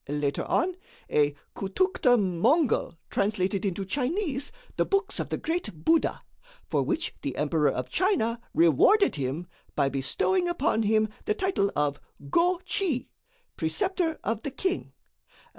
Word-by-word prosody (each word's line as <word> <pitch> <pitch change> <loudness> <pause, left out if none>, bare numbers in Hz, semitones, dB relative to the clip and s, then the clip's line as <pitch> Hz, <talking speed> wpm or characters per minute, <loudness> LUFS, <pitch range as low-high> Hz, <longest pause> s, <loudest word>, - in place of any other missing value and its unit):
Later 145 -1 -1
on, 360 +1 +1 0.3
a 145 -1 +3 0.2
Khoutoukhte 245 - +2
Mongol 200 - +2
translated 195 -1 0
into 195 -1 -2
Chinese 285 - -1 0.2
the - - +2
books 395 +1 0
of - - -3
the - - -1
great 230 - -4
Buddha, 330 -1 +2 0.4
for - - 0
which 335 0 -1
the 135 - -3
Emperor 150 +1 +2
of 125 - -3
China 240 - +1
rewarded 170 - +5
him 140 +5 -2 0.3
by 135 - +2
bestowing 350 - +1
upon 320 -9 +1
him 215 0 +3 0.2
the 210 - +1
title 375 - +1
of 145 -1 0 0.3
'Go 355 +1 +3
Chi 325 - -1 0.5
'Preceptor 370 -5 0
of 225 -1 -1
the 280 - -3
King!' 360 - -2
230 Hz, 135 wpm, -27 LUFS, -, 0.5 s, rewarded